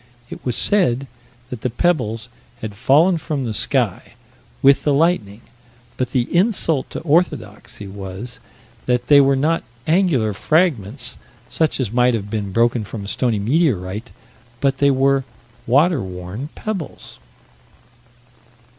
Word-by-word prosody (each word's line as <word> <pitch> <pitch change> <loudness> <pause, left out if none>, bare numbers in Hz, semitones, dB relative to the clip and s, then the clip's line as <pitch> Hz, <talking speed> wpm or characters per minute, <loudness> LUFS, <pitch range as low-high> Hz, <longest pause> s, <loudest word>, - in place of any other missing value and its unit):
It - - -8
was 125 -2 -1
said 140 - +2 0.5
that 125 -3 -6
the 125 - -1
pebbles 120 -6 0 0.3
had 110 -2 -5
fallen 160 - +3
from 150 -4 -3
the 115 -3 -3
sky, - - 0 0.5
with 140 0 +6
the 145 -2 +2
lightning. 130 - +1 0.5
But 130 -1 -2
the 125 -1 +1
insult 175 - +2
to - - -6
orthodoxy 145 - -1
was 100 +5 -7 0.5
that 125 -1 0
they 145 -1 +8
were 135 0 +3
not 155 +5 +1 0.2
angular 155 - +2
fragments 130 - 0 0.3
such 160 -3 0
as 120 -6 -1
might 125 0 +3
have 100 -2 -5
been 105 -3 -3
broken 115 +2 +2
from 105 0 -7
a - - -7
stony 115 +1 0
meteorite: 110 - 0 0.5
that 135 -1 +1
they 140 - +4
were 135 0 +2 0.4
"water 145 +4 +3
worn 95 +8 -6
pebbles." 200 -8 -6
125 Hz, 135 wpm, -20 LUFS, 110-155 Hz, 0.5 s, they